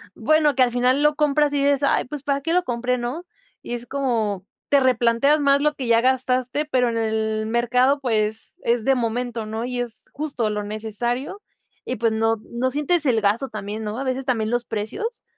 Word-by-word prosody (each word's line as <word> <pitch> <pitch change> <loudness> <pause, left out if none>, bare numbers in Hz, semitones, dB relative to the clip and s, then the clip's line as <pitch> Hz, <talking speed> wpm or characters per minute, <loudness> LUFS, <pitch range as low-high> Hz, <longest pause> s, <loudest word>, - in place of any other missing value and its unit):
bueno, 310 -1 +3
que 260 - +5
al 245 - +1
final 250 +3 +2
lo 300 0 +3
compras 295 -1 +2
y 280 -1 +1
dices: 280 -1 +2
"Ay, - - +2
pues 290 +1 -7
¿para 280 -1 0
qué 325 - -2
lo 360 +1 +3
compré?" 245 +1 -1
¿no? 250 +9 -4 0.4
Y 240 - -4
es 240 0 -7
como 230 -8 -1 0.2
te 285 - +5
replanteas 255 +3 +3
más 280 -1 +3
lo 300 0 +1
que 265 - -4
ya 230 0 +4
gastaste, 255 +2 +1
pero 255 -5 +1
en 230 - -2
el 220 -1 -1
mercado, 250 +4 +2
pues, 220 -3 -1
es 235 -1 +1
de 270 +3 +3
momento, 240 -1 -2
¿no? 220 +1 -4
Y 250 0 -3
es 240 -2 -5
justo 275 -7 -2
lo 210 0 -2
necesario, 225 - -3 0.4
y 250 - -2
pues, 230 0 +1
no 225 +1 +1 0.2
no 245 +2 0
sientes 300 +4 0
el 235 -5 +2
gasto 210 +6 +1
también, 215 -1 -6
¿no? 210 +1 -4
A - - -2
veces 260 0 -2
también 225 -5 0
los 240 0 -1
precios, 225 - -4
245 Hz, 205 wpm, -22 LUFS, 225-280 Hz, 0.4 s, que